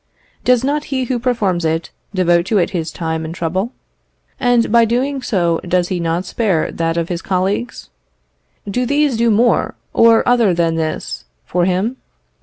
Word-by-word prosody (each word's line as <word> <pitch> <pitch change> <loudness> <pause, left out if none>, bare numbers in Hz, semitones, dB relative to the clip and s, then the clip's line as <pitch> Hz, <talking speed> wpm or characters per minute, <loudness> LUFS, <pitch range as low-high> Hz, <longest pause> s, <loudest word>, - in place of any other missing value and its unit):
Does 250 -1 +3
not 290 +2 0
he 265 -2 -2
who 250 0 -1
performs 215 -8 0
it 160 +1 -1 0.2
devote 175 -2 +2
to 215 - +2
it 175 - +1
his 170 -4 -2
time 160 -1 -3
and 160 +1 -6
trouble? 185 +7 -2 0.7
and 245 -3 +2
by 235 +1 +6
so 230 - +3
doing 265 +4 0 0.5
does 180 0 +1
he 185 - -1
not 170 +2 -1
spare 190 -6 0
that 165 0 -1
of 170 0 -1
his 175 -1 -3
colleagues? 195 +5 -2 0.8
Do 245 +5 -1
these 285 -1 +2
do 235 +1 +2
more 230 +3 +2 0.2
or 230 -1 +5
other 235 -7 +3
than 165 -1 +1
this 160 - -3 0.2
for 175 0 0
him? 190 +8 0
195 Hz, 170 wpm, -17 LUFS, 170-240 Hz, 0.8 s, by